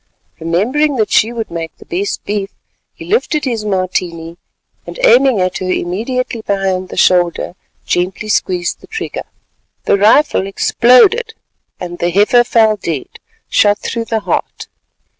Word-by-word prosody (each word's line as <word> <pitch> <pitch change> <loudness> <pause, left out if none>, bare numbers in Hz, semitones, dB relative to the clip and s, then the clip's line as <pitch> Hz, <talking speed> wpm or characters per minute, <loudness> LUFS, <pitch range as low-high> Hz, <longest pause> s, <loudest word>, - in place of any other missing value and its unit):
Remembering 245 - 0
that 220 -4 0
she 225 - +3
would 230 -2 -5
make 165 -1 -6
the - - -15
best 195 +4 -3
beef, 205 -1 -2 0.5
he - - -10
lifted 340 -9 0
his 230 -4 -2
Martini, 180 -4 -3 0.5
and - - -8
aiming 265 - +5
at 185 0 -1
her 185 - -4
immediately 230 +7 -2
behind 190 -3 -2
the - - -8
shoulder, 175 -1 +2 0.3
gently 185 +4 -2
squeezed 180 -4 -1
the - - -15
trigger. 445 0 -5 0.6
The 200 - +2
rifle 215 0 +3
exploded, 370 - +3 0.4
and 175 -1 -7
the 175 - 0
heifer 210 +7 +4
fell 220 -3 +3
dead, 160 -8 -4 0.4
shot 205 0 +3
through 230 +1 -4
the 225 -1 -2
heart. - - -3
205 Hz, 140 wpm, -15 LUFS, 180-240 Hz, 0.6 s, aiming